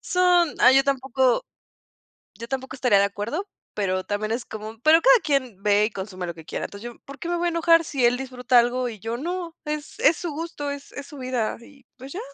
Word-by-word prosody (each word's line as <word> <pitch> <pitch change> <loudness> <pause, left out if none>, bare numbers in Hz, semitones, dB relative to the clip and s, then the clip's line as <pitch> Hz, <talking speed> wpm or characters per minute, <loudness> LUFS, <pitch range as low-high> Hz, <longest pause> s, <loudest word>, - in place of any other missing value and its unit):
Son 360 -3 +3
ay, 255 +2 +7
yo 270 - +6
tampoco 265 -2 +1 0.9
yo 230 +3 -8
tampoco 265 +1 -4
estaría 250 -6 +3
de 200 - +4
acuerdo, 215 - -4 0.3
pero 185 -2 -1
también 215 +1 -3
es 235 +1 -2
como. 215 +1 -8
"Pero 320 +3 +6
cada - - +6
quien 260 -9 -1
ve 210 0 +4
y 220 - -3
consume 190 -2 -6
lo 170 - -4
que 160 -1 -13
quiera". - - -4
Entonces 215 +4 -8
yo, - - -19
¿por 275 0 -11
qué 340 - -5
me 345 - 0
voy 345 - -1
a - - +2
enojar?, 335 0 +4
si 275 -6 0
él 240 +1 +3
disfruta 255 -1 0
algo 245 +1 +1
y 225 - -8
yo 225 +3 -4
no, 340 +3 -4
es 300 0 -5
es 315 +3 +4
su 345 -3 -4
gusto, 295 -2 -5
es 285 0 -8
es 285 - -7
su 295 - -11
vida 255 -4 -2
y, 270 +2 -18
pues, 265 +2 -10
ya. 370 - -5
260 Hz, 235 wpm, -24 LUFS, 225-305 Hz, 0.9 s, ay